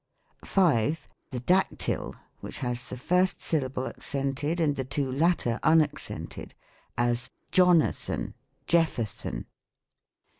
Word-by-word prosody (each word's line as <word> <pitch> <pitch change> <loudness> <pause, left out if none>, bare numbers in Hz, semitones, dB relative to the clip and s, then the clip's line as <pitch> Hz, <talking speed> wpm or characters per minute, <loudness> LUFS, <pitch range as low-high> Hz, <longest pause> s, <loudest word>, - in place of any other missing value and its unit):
5. 160 - +2 0.2
The 125 -3 -5
Dactyl, 185 +9 +1 0.2
which - - -7
has 125 -1 -3
the - - -6
first 180 +8 +2
syllable 130 -4 -1
accented 140 +4 -2
and 150 -3 +2
the 135 - -2
two 135 0 -2
latter 140 -5 +2
unaccented: 160 -1 0 0.4
as, 120 0 +1 0.2
"Jonathan, 180 -3 +3 0.3
Jeffer 165 -8 +2
son." 105 - -6
145 Hz, 105 wpm, -28 LUFS, 125-170 Hz, 0.4 s, Jonathan